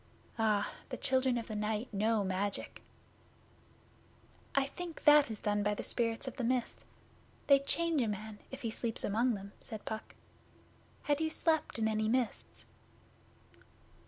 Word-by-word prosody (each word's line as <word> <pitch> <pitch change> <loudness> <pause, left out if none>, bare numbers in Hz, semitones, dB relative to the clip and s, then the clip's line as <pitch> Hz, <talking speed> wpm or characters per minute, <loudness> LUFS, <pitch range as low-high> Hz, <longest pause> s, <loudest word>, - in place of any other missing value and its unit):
Ah! 210 -2 +2 0.2
The - - -4
Children 260 -1 +2
of 230 - -3
the 215 - -5
Night 215 +2 -2
know 215 +1 +2
magic.' 195 +1 -2 1.7
'I 275 -1 +4
think 335 +4 -7
that 295 -3 +7
is 220 -2 -5
done 205 -1 +1
by 210 0 +1
the - - -4
Spirits 230 +2 -1
of 260 - -5
the 255 - -2
Mist. 245 0 0 0.6
They 280 -1 +7
change 325 +2 +1
a 230 - +1
man, 210 +1 -5
if 265 0 -8
he 230 - -1
sleeps 225 0 -2
among 230 +3 +2
them,' 200 0 -8
said 215 -2 -8
Puck. 220 0 -5 0.9
'Had 290 +1 +1
you 320 - +1
slept 315 -3 +1
in 220 -1 +2
any 215 0 +1
mists? 245 -1 -1
230 Hz, 155 wpm, -33 LUFS, 210-265 Hz, 1.7 s, that